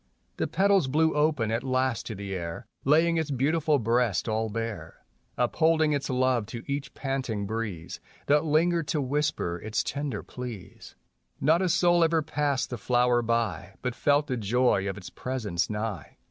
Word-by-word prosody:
The - - 0
petals 195 -6 +3
blew 160 +4 +2
open 150 -7 +1
at 115 +1 0
last 130 -3 0
to 110 - -5
the 100 0 -5
air 85 +5 -5 0.2
Laying 165 +4 +4
its 160 -2 -1
beautiful 150 +3 +2
breast 115 -5 +1
all 110 0 0
bare, 110 -7 -5 0.3
Upholding 155 +5 +2
its 140 -3 -2
love 130 -4 +1
to 115 +1 -7
each 140 -1 -4
panting 130 -7 -2
breeze 105 -6 -4 0.3
That 150 +1 +3
lingered 165 +1 +2
to 155 - 0
whisper 140 - -1
its 110 0 -1
tender 140 -6 -3
pleas. 110 -7 -9 0.4
Not 160 +5 +3
a 185 - +1
soul 175 0 +4
ever 165 -1 +2
passed 145 -3 -1
the 120 - -4
flower 120 +1 +2
by 110 -6 -1
But 125 -1 -1
felt 145 +4 +2
the 130 -3 -2
joy 110 -2 +2
of 95 - -5
its 90 - -9
presence 110 -10 -2
nigh. 105 -6 -4
125 Hz, 165 wpm, -27 LUFS, 110-150 Hz, 0.4 s, Laying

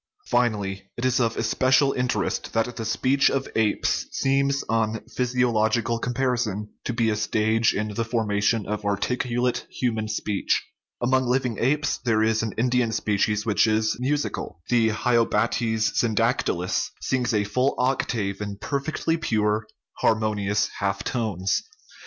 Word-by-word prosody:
Finally, 100 -5 0
it 120 - -2
is 130 0 +2
of 115 -2 0
especial 130 +4 +3
interest 125 0 -1
that 115 +2 0
the 115 - -4
speech 130 +5 +2
of 135 -1 -1
apes 110 -2 +1
seems 140 +1 +1
on 110 0 0
physiological 115 -2 +1
comparison 120 -5 -1 0.2
to - - -2
be 115 -2 +1
a - - 0
stage 110 +1 +1
in 105 +1 -2
the 115 - -1
formation 110 -1 0
of 105 0 -3
articulate 120 +4 -1
human 110 -4 -2
speech. 105 -2 -1 0.4
Among 130 +1 +2
living 125 -2 0
apes 145 +4 +1
there 110 -3 +2
is 110 0 +2
an 115 -2 -3
Indian 125 0 +2
species 105 0 0
which 110 0 +3
is 110 0 +1
musical; 140 - -2
the 115 -2 +3
hylobates 115 -1 +1
syndactylus 115 -5 0
sings 125 -2 0
a 105 -2 +2
full 125 +7 0
octave 115 -6 -1
in 100 -1 -4
per 140 +7 -2
fectly 160 +3 -2
pure, 105 -4 0 0.3
harmonious 105 -2 +1
half 100 0 -1
tones. 105 - -1
115 Hz, 140 wpm, -24 LUFS, 105-125 Hz, 0.4 s, especial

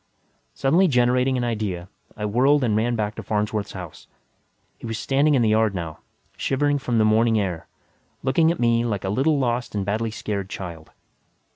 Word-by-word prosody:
Suddenly 170 - +3
generating 125 -1 +2
an 125 - -1
idea, 105 -7 -3 0.3
I 105 - -3
whirled 130 +7 +3
and 110 -4 +1
ran 120 +3 +1
back 105 -2 -2
to - - -7
Farnsworth's 105 0 -2
house. 90 -5 -9 0.7
He - - -7
was 115 -1 -3
standing 140 +5 +2
in 125 - +3
the 110 - +3
yard 110 -2 +2
now, 85 -3 -5 0.4
shivering 145 +1 0
from 125 -3 -1
the 110 - +4
morning 110 +1 +3
air, 90 -5 -3 0.6
looking 160 +5 +3
at 170 - -4
me 115 -1 +2
like 105 -6 -2
a 95 - -2
little 140 +9 +2
lost 120 -3 -1
and 100 -2 -1
badly 110 +3 -1
scared 100 -3 -4
child. 85 -5 -7
115 Hz, 180 wpm, -23 LUFS, 105-130 Hz, 0.7 s, the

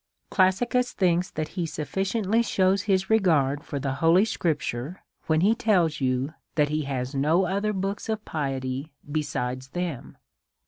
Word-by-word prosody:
Classicus 235 +7 +2
thinks 180 -1 +1
that 155 0 -4
he 175 -3 -3
sufficiently 195 - 0
shews 190 -3 +2
his 190 0 +2
regard 150 -10 +3
for 145 - -5
the 135 -1 -2
holy 170 +5 +5
scriptures, 155 - -2 0.3
when 160 0 +3
he 205 +5 +5
tells 180 -10 +1
you 130 +3 0 0.2
that 150 -2 +3
he 155 +1 0
has 130 -1 -3
no 155 +7 +2
other 200 +4 0
book 195 +1 -2
of 220 -1 -2
piety 135 -1 -3 0.2
besides 130 -4 -2
them. 170 -2 -5
165 Hz, 145 wpm, -26 LUFS, 140-195 Hz, 0.3 s, holy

